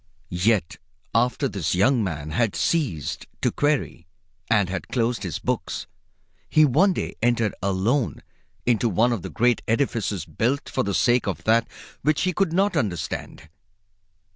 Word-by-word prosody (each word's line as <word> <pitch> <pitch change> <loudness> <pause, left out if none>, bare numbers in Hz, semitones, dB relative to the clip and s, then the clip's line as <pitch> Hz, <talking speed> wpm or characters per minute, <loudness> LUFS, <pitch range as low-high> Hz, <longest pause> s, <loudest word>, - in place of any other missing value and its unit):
Yet 95 -1 +1 0.4
after 125 +4 +2
this 90 -8 -2
young 120 +5 +3
man 80 -5 -4
had 110 +5 +1
ceased 120 - -1 0.2
to - - +3
query 145 - -1 0.4
and 105 -4 +3
had 95 0 -4
closed 120 -2 0
his 90 -7 -3
books, - - -3 0.6
he 155 0 +5
one 175 +9 +4
day - - -3
entered 115 -3 +2
alone 100 +7 0 0.4
into 120 -1 +2
one 115 +5 +2
of 110 - -3
the - - -6
great 120 0 +2
edifices 110 - 0
built 130 +5 -1
for - - -1
the 100 -1 -1
sake 120 -1 +3
of 95 -6 -3
that 115 +1 +3 0.3
which 145 0 +1
he 185 0 +1
could 190 -1 +1
not 195 +2 +2
understand. 90 - -3
115 Hz, 150 wpm, -24 LUFS, 95-135 Hz, 0.6 s, he